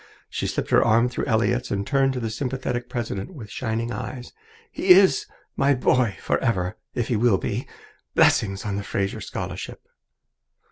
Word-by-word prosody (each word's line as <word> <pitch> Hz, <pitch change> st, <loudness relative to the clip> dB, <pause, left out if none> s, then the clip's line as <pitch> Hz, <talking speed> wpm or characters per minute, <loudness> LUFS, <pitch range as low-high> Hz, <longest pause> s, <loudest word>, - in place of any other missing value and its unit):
She -, -, -2 dB
slipped -, -, -3 dB
her -, -, +6 dB
arm 115 Hz, +3 st, +3 dB
through -, -, -3 dB
Elliott's 120 Hz, +1 st, +1 dB
and 100 Hz, 0 st, -1 dB
turned 135 Hz, +1 st, +2 dB
to 130 Hz, -, -3 dB
the 115 Hz, -2 st, -3 dB
sympathetic 125 Hz, 0 st, -3 dB
president 115 Hz, -, -4 dB
with 110 Hz, -7 st, -9 dB
shining 115 Hz, +3 st, -2 dB
eyes. 125 Hz, +3 st, -6 dB, 0.4 s
"He 190 Hz, -, -4 dB
is 180 Hz, -6 st, +6 dB, 0.3 s
my 140 Hz, +1 st, +3 dB
boy 125 Hz, -4 st, +2 dB
forever, 95 Hz, -5 st, 0 dB, 0.2 s
if 120 Hz, -, -1 dB
he 120 Hz, -, +1 dB
will 110 Hz, -2 st, +3 dB
be. -, -, -3 dB, 0.5 s
Blessings 95 Hz, -1 st, +3 dB
on 100 Hz, -1 st, -2 dB
the 100 Hz, -, -3 dB
Fraser 100 Hz, 0 st, -2 dB
Scholarship!" -, -, -6 dB
115 Hz, 160 wpm, -24 LUFS, 105-130 Hz, 0.5 s, her